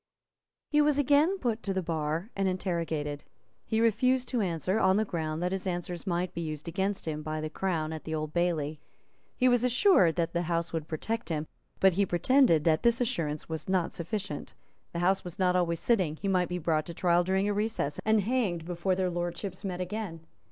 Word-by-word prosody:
He 300 0 +5
was 295 -1 +3
again 290 +7 +4
put 235 - -1
to 195 -1 -2
the 190 - 0
bar 165 +4 -2
and 195 -1 +1
interrogated. 165 -6 -2 0.4
He 220 - -1
refused 250 +3 +2
to 245 -3 0
answer, 180 +2 0
on 190 -1 +4
the 220 - +2
ground 160 -3 -3
that 180 - 0
his 190 0 -2
answers 175 +1 -4
might 175 0 -1
be 170 - -4
used 155 -2 -5
against 190 +3 -1
him 155 -1 -2
by 155 0 -3
the 155 0 -4
Crown 160 -4 -1
at 160 - -6
the 160 - -3
Old 155 0 -4
Bailey. 160 -4 0 0.6
He 255 - +4
was 245 -1 +4
assured 250 - +4
that 170 -1 -1
the 170 - +1
House 170 0 -1
would 160 -2 -3
protect 220 +9 -3
him; 155 -2 -1 0.3
but 190 -1 +5
he 200 +3 +2
pretended 175 - +4
that 160 -1 +3
this 235 0 +3
assurance 165 - -1
was 160 +1 -5
not 185 -3 +1
sufficient; 190 -2 -4 0.4
the - - -5
House 190 +1 +2
was 175 -2 -8
not 180 -1 +2
always 170 -2 +1
sitting; 185 -10 +2
he 200 - -5
might 185 -2 +2
be 180 - -2
brought 155 -2 0
to 170 - -7
trial 175 0 +3
during 190 +2 +1
a 205 - +1
recess, 205 -9 -1
and 220 -1 +3
hanged 200 -7 0
before 180 +2 -1
their 185 -1 0
Lordships 175 +3 -4
met 185 -2 -3
again. 180 -3 -4
180 Hz, 210 wpm, -29 LUFS, 165-210 Hz, 0.6 s, He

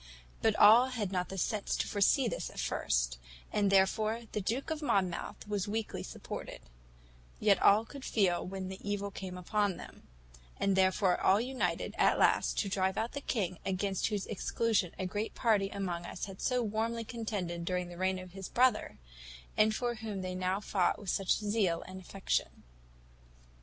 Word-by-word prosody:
But 220 -1 +3
all 225 +5 +8
had 225 -7 -3
not 180 -1 -1
the 195 - -6
sense 205 +3 -1
to - - -1
foresee 215 +6 +3
this - - -3
at - - -9
first; - - 0 0.3
and 205 -1 +2
therefore 215 +4 +2
the 210 - -2
Duke 245 - -2
of 315 -1 -2
Monmouth 195 - -1
was 205 -1 -1
weakly 220 +1 -3
supported; - - -7 0.8
yet 200 -3 +4
all 210 +3 +6
could 275 +2 -10
feel 190 -9 +1
when 190 0 -5
the 190 +1 -7
evil 200 0 -3
came 185 -2 -6
upon 200 +1 0
them; - - -12 0.5
and 195 -1 +2
therefore 190 0 +3
all 195 +2 +5
united, 255 +3 -1
at - - +4
last, - - +3
to 205 - +1
drive 190 -1 0
out 225 +2 -1
that 285 - -7
king, 185 -7 -1
against 190 0 0
whose 210 -3 -2
exclusion 215 -2 0
a 190 - -2
great 205 +4 -3
party 210 -5 +2
among 180 -4 -3
us - - -5
had 195 -2 -10
so 250 -2 +1
warmly 225 +2 -1
contended 205 -7 -4
during 180 0 -1
the 175 - -9
reign 185 0 +1
of 185 -1 -9
his 195 0 -7
brother, 250 -2 +2 0.6
and 215 0 +4
for 240 0 -1
whom 215 -4 -5
they 185 0 -3
now 185 +1 0
fought 195 -3 +1
with 200 -3 -3
such 195 -2 -2
zeal 205 -5 0
and 185 0 -9
affection." 190 +2 -2
200 Hz, 180 wpm, -32 LUFS, 185-220 Hz, 0.8 s, all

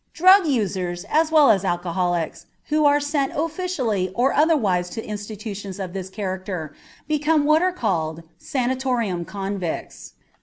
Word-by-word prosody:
Drug 370 +1 +6
users, 185 - -1
as 315 +1 +3
well 300 -6 +6
as 195 -3 +2
alcoholics, 175 -2 -1 0.2
who 305 0 +2
are 290 0 +5
sent 285 -1 -1
officially 295 - -1
or 250 +3 +2
otherwise 215 - +2
to 225 - -6
institutions 205 -2 -6
of 185 -2 -5
this 190 -1 -5
character 185 -5 -5 0.3
become 305 0 +2
what 310 +2 +4
are 370 +1 +2
called 165 - -2 0.2
"sanatorium 250 -8 -1
convicts." 195 -1 -5
210 Hz, 130 wpm, -22 LUFS, 185-295 Hz, 0.3 s, Drug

